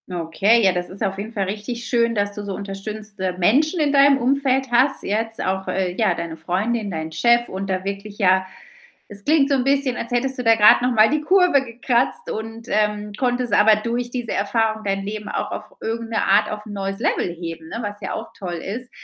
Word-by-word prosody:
Okay, 180 +6 +2
ja, 190 - +5
das 180 0 -3
ist 195 +3 -6
auf 195 -1 -1
jeden 215 +3 -5
Fall 205 -4 -2
richtig 215 +5 -5
schön, 235 -2 +1
dass 205 0 0
du 205 - -6
so 200 -2 -4
unterstützende 200 -1 -5
Menschen 290 - +2
in 295 -2 +1
deinem 280 0 +6
Umfeld 265 0 +1
hast 265 +3 +3
jetzt, 225 +2 -2
auch, 190 0 -2
äh, 185 -2 -1
ja, 205 -5 +1
deine 165 -1 -5
Freundin, 205 +7 -2
dein 160 -1 -4
Chef 235 +9 +3
und 195 +1 -5
da 185 0 -1
wirklich 200 +1 -6
ja 190 -2 +3 0.7
es 200 0 -1
klingt 295 -2 +3
so 280 - +3
'n 255 -2 0
bisschen, 275 -2 +2
als 235 - -5
hättest 260 +2 -1
du - - -2
da 225 0 +6
grad 210 +1 +6
noch 250 0 +1
mal 220 -1 +5
die 305 - +1
Kurve 355 -4 +3
gekratzt 245 - 0
und, 225 +1 -6
ähm, 210 0 0
konntest 245 -2 0
aber 210 +1 +6
durch 235 +3 -3
diese 245 -2 -4
Erfahrung 220 +1 0
dein 195 0 -1
Leben 210 +1 -6
auch - - -3
auf - - -5 0.2
irgend 230 +1 -4
'ne 225 - 0
Art 200 +2 +3
auf 210 0 -6
'n 215 - -9
neues 195 0 -3
Level - - 0
heben, 165 -1 -7
ne, 230 - -6
was 205 -1 -5
ja - - -5
auch - - -6
toll 180 -3 -4
ist. 215 +9 -5
215 Hz, 220 wpm, -21 LUFS, 195-245 Hz, 0.7 s, deinem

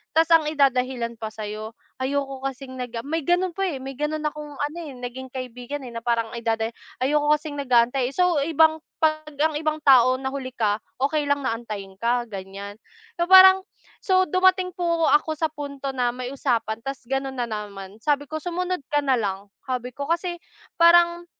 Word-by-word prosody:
tas 325 +1 +5
ang 320 -2 +5
idadahilan 255 -5 +1
pa 220 - -4
sayo 215 +1 -7 0.3
ayoko 275 0 -2
kasing 270 0 -8
nag 240 -2 -5
may 320 +3 -1
ganon 355 +4 +1
pa 390 +1 -1
eh, 295 -6 -3
may 270 0 -6
ganun 300 +1 -2
akong 300 -1 -5
ano 295 +4 -3
eh, 315 -4 -7
naging 250 +1 -7
kaibigan 255 +2 -6
eh, 240 - -8
na 230 - -4
parang 230 -1 0
idada 225 -1 -1 0.4
ayoko 295 +2 +2
kasing 295 -1 -7
nag-aantay. 245 0 +2
So 360 -4 +3
ibang 315 +1 +3 0.2
pag 310 -1 +1
ang 310 +1 +2
ibang 310 -1 -1
tao 255 -2 +7
nahuli 265 0 -4
ka, 210 -3 +1 0.2
okey 295 0 +1
lang 285 0 +1
na - - +1
antayin 210 -4 -7
ka 240 +1 +1
ganyan. 200 0 -8 0.4
So 345 - +1
parang 380 0 +9 0.4
so 375 -1 +3
dumating 370 +1 +3
po 335 -2 0
ako 300 +2 +3
sa 320 - +1
punto 280 -2 -5
na 250 -2 +1
may 250 +2 -5
usapan 230 -5 -1
tas 270 +2 -6
ganun 270 +1 -3
na 245 - 0
naman, 205 -2 -7
sabi 290 0 +1
ko 315 +2 -5
sumunod 360 0 -2
ka 290 0 +2
nalang 205 -7 0 0.2
sabi 250 -1 -3
ko 280 +3 -6
kasi 345 +1 -1 0.4
parang 345 0 +5
275 Hz, 180 wpm, -24 LUFS, 240-315 Hz, 0.4 s, parang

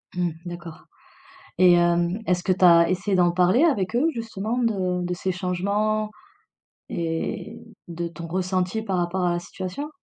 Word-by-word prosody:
Mmh, 175 -2 0
d'accord 170 -2 -9 0.8
et 180 -1 +7
hem, 175 +3 +2
est-ce 180 -1 +1
que 185 - +2
tu 185 0 +1
as 170 -1 +7
essayé 185 +2 0
d'en 175 -1 +3
parler 185 - +4
avec 225 - +1
eux, 290 +6 +3
justement, 225 0 -3
de 185 -7 0
de 180 - -2
ces 185 +1 -2
changements 200 +4 -1 0.8
et 165 +7 -3 0.3
de 170 0 -4
ton 170 0 -8
ressenti 185 +4 -1
par 190 -4 -2
rapport 180 +1 -1
à 175 - +2
la 175 - -1
situation? 185 +11 -6
180 Hz, 160 wpm, -24 LUFS, 175-205 Hz, 0.8 s, et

